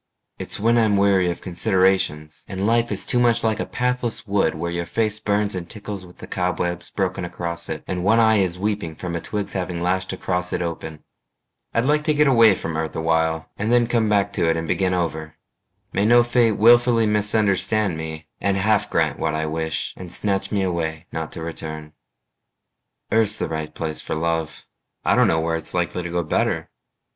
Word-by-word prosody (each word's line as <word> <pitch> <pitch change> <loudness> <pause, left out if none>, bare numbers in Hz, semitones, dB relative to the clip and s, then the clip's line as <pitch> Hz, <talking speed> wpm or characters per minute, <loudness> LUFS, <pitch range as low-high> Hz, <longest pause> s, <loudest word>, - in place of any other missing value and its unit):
It's - - -3
when 115 +3 +3
I'm 110 -3 +3
weary 100 -2 +3
of 85 - -4
considerations, 90 -5 0
And 95 0 -3
life 115 +1 +2
is 100 - -1
too 125 - +1
much 120 -1 +3
like 110 -1 +1
a - - -2
pathless 125 -2 -1
wood 100 -5 +1
Where 85 +2 -3
your 85 0 -3
face 110 -1 0
burns 105 -1 0
and 90 -2 -5
tickles 100 -3 -7
with 90 - -17
the - - -9
cobwebs 90 -1 -2
Broken 95 -2 -2
across 85 -1 -4
it, 80 - -4
and 90 -1 -3
one 110 +4 +4
eye 110 -1 +5
is 90 -3 +1
weeping 100 -5 -2
From 85 0 -5
a 85 - -3
twig's 105 -2 -4
having 90 -2 -3
lashed 95 +2 -1
across 90 -1 -2
it - - -1
open. 80 -2 -6 0.7
I'd 115 - +1
like 150 +2 +2
to 155 -1 +2
get 150 0 +4
away 115 -7 +6
from 80 -3 -4
earth 80 0 -3
awhile 80 0 0
And 105 +3 0
then 120 -1 +4
come 115 -2 +1
back 100 -1 +2
to 85 -4 +1
it 80 - +1
and 80 0 -3
begin 90 +1 +1
over. 80 -3 -3 0.6
May 100 +2 +2
no 120 +1 +6
fate 120 -2 +3
willfully 120 +1 +5
misunderstand 105 -2 +2
me 80 0 -6
And 100 -1 +1
half 105 +1 +2
grant - - 0
what 75 - -1
I 80 0 -1
wish 80 0 -2
and 90 -2 -9
snatch 100 0 -1
me 100 -2 +1
away 80 -3 -2
Not 80 -1 -4
to 80 - -6
return. 80 -2 -6 1.2
Earth's 110 -2 +2
the - - -2
right 80 -1 -4
place 80 -2 -4
for - - -4
love: 80 -1 -2 0.4
I - - +4
don't - - +5
know 80 - +2
where 80 0 0
it's 80 - -5
likely 90 0 -1
to 90 - -5
go 85 0 -1
better. 75 - -1
95 Hz, 200 wpm, -22 LUFS, 80-110 Hz, 1.2 s, away